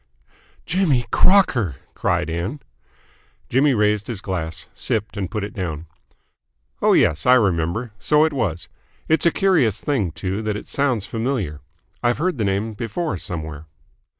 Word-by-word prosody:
"Jimmy 160 -9 +2
Crocker!" 130 - +4 0.2
cried - - 0
Ann. 85 - -3 0.9
Jimmy 135 +2 +3
raised 105 -1 +1
his 115 -5 -3
glass, 80 -5 -4
sipped, 110 -3 -2
and 95 -4 -3
put 105 +2 -3
it 100 - -5
down. 85 -5 -4 1.0
"Oh - - +4
yes, 80 +6 +3
I 125 - +8
remember. 100 +1 +1
So 150 +1 +4
it 160 - -1
was. 90 - -2 0.4
It's 160 +2 +3
a - - +4
curious 160 - +2
thing, 110 - 0
too, 95 +6 -3
that 105 -1 -2
it - - -9
sounds 130 -8 0
familiar. 110 - -2 0.4
I've 120 0 +2
heard 165 -2 -1
the - - +1
name 100 +3 -1
before 115 - -3
somewhere." 80 -3 -5
105 Hz, 150 wpm, -22 LUFS, 90-130 Hz, 1.0 s, I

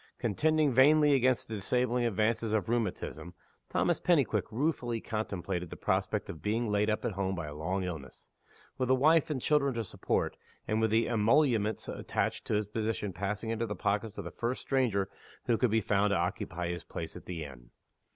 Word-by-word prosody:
Contending 150 +6 +2
vainly 145 +3 +6
against 130 -2 +2
the 110 - -6
disabling 125 +4 0
advances 110 0 +1
of 105 -5 +1
rheumatism, 105 -6 -2 0.3
Thomas - - +1
Pennyquick - - +2
ruefully 120 -2 -1
contemplated 95 -6 -3
the - - -7
prospect - - 0
of 80 - -8
being 115 +3 0
laid 105 0 +1
up 110 - -1
at - - 0
home 95 0 -2
by 85 -3 -4
a 75 - -7
long 90 +6 -2
illness 80 -7 -7 0.5
with 130 -1 0
a 130 - +6
wife 155 +4 +4
and 145 -4 -1
children 140 -1 +2
to 115 - -1
support, 100 - -2 0.3
and 110 +1 +1
with 110 - +3
the 110 +2 +2
emoluments 115 -2 +2
attached - - -2
to - - +1
his 105 0 +1
position 105 -1 -2
passing 100 +4 -3
into 115 +1 -1
the 105 - -3
pockets 105 +3 -1
of - - -4
the - - -7
first 120 +2 -3
stranger 115 -8 +1 0.4
who 120 - +3
could 125 +2 +2
be 110 +1 +2
found 105 -1 +2
to 100 - +2
occupy 85 0 -2
his 85 0 -4
place 80 -1 -6
at - - -11
the 85 -3 -4
inn. - - -12
110 Hz, 190 wpm, -31 LUFS, 95-120 Hz, 0.5 s, vainly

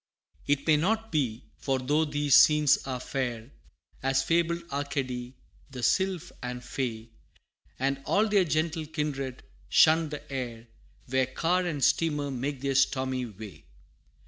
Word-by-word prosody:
VI. 145 - +5
It 140 0 -4
may 155 -1 +5
not 220 +7 0
be, 130 -6 -1 0.2
for 135 -1 0
though 145 +5 +1
these 145 -2 0
scenes 150 0 +6
are 130 -1 -3
fair, 125 -2 -4 0.5
As 135 0 +1
fabled 170 0 +1
Arcady 135 -3 -3 0.3
the 130 -3 -7
sylph 190 0 +1
and 125 0 -5
fay, 115 -3 -4 0.7
And 135 +1 -1
all 215 +2 +3
their 205 -3 +3
gentle 155 0 -1
kindred, 140 -4 -4 0.3
shun 160 0 +5
the 150 -1 -7
air, 120 -3 -5 0.4
Where 130 0 +1
car 175 +6 0
and 145 -5 -2
steamer 150 -4 +1
make 135 +1 -3
their 140 0 0
stormy 130 -1 +1
way. 100 -7 -11
140 Hz, 145 wpm, -28 LUFS, 130-155 Hz, 0.7 s, scenes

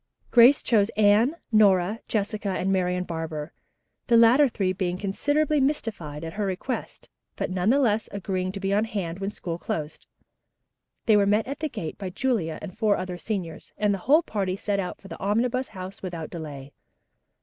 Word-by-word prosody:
Grace 245 +4 +7
chose 215 -3 +3
Anne, 215 +7 +4 0.2
Nora, 205 -1 +4
Jessica 210 -1 -2
and 190 0 -1
Marian 180 -1 0
Barber, 160 -2 -5 0.5
the 235 - +5
latter 240 +5 +6
three 195 -6 -1
being 180 -1 -2
considerably 290 +10 +1
mystified 205 - -2
at 165 0 -5
her 210 0 -2
request, 190 +7 -4 0.3
but - - -3
nevertheless 220 +4 +2
agreeing 185 -2 -2
to 195 - -5
be 195 0 -1
on 210 +2 +2
hand 190 -5 -4
when 195 0 -2
school 170 -4 -5
closed. 155 -2 -5 1.0
They 220 - +5
were 200 -1 +4
met 210 +2 +2
at 280 +3 -5
the 310 - -2
gate 190 - -6
by 195 -2 -4
Julia 190 - -1
and 185 -3 -7
four 215 -2 +2
other 180 -1 -5
seniors, 185 -7 -5
and 210 -1 +2
the 195 - -3
whole 300 - +4
party 195 - -2
set 200 0 -2
out 180 -2 -4
for 195 - -13
the - - -9
Omnibus 245 +6 0
House 190 -1 -9
without 170 -4 -6
delay. 145 -5 -8
200 Hz, 175 wpm, -25 LUFS, 180-225 Hz, 1.0 s, Grace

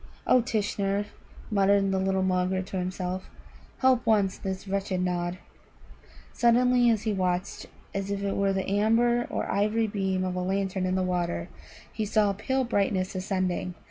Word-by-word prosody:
"O 255 - +5
Tishnar," 205 -3 -1 0.5
muttered 200 -1 +3
the 190 - +1
little 190 0 +1
Mulgar 185 0 +1
to 190 0 -4
himself, 185 0 -4 0.5
"help 260 -2 +4
once 205 -4 +2
this 190 0 -5
wretched 195 -1 -1
Nod!" 175 0 -1 1.0
Suddenly, 245 0 +4
as 220 -2 +1
he 220 -2 0
watched, 185 -1 -2 0.3
as 195 0 -3
if 200 0 -2
it 200 - -1
were 200 0 +2
the 190 -1 -2
amber 230 +4 +2
or - - -2
ivory 215 +3 +1
beam 190 -3 -1
of 185 -1 -2
a 180 - -2
lantern 190 0 -1
in 185 - 0
the 185 - +1
water, 175 - -2 0.4
he 220 - -2
saw 210 -1 +2
a - - -3
pale 260 +7 -1
brightness 200 -5 0
ascending. 185 -1 -2
195 Hz, 165 wpm, -27 LUFS, 185-210 Hz, 1.0 s, O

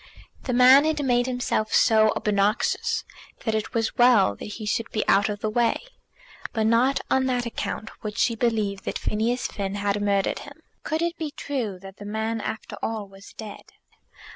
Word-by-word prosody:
The 255 - -1
man 255 +3 +7
had 305 -2 0
made 245 -1 +2
himself 245 -4 -1
so 220 -1 +5
obnoxious 205 +1 +1 0.4
that 220 - +1
it 215 +1 -3
was 225 -1 -1
well 240 - +5
that - - -8
he 220 - -7
should 225 +2 -1
be 215 - -2
out 200 +2 +4
of 205 -1 -4
the 215 - 0
way. 235 +1 +2 0.7
But 220 -2 0
not 235 +5 +3
on 265 0 +3
that 250 -1 0
account 225 -1 -4
would 210 0 -5
she 235 - +2
believe 215 -4 0
that - - -2
Phineas 235 +4 -1
Finn 200 -1 -3
had 205 0 -1
murdered 200 -1 +1
him. 305 +3 -13 0.2
Could 315 +2 -2
it 340 0 -2
be 315 -2 -2
true 270 - -4
that 195 0 -11
the 205 - -9
man 220 +2 -2
after 220 - -5
all 220 -2 -3
was 195 0 -15
dead? 215 -2 -9
225 Hz, 185 wpm, -25 LUFS, 205-250 Hz, 0.7 s, man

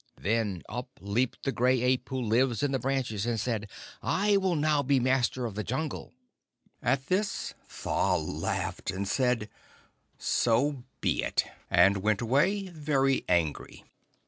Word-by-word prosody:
Then 105 -4 0
up 125 +3 -5
leaped 110 +6 -1
the 135 - 0
Gray 125 0 +2
Ape 125 0 +1
who 130 - -2
lives 120 +1 +1
in 145 - +1
the 135 - 0
branches, 125 -5 -1
and 115 -2 0
said, 105 -3 -2 0.3
'I 205 +1 +2
will 190 -3 +1
now 150 -1 +2
be 140 0 +2
master 130 0 +1
of 115 - -4
the 105 +2 -3
Jungle.' 135 +6 -3 0.7
At 135 +2 +1
this 200 +5 -1 0.2
Tha - - 0
laughed, - - -3
and 95 +1 -2
said, 125 -1 +1 0.7
'So 125 +3 +1 0.2
be - - +1
it,' - - +1 0.2
and 95 +3 +5
went 105 +1 +1
away 180 - +2
very 145 -5 +1
angry. 85 -4 0
125 Hz, 145 wpm, -29 LUFS, 110-140 Hz, 0.7 s, and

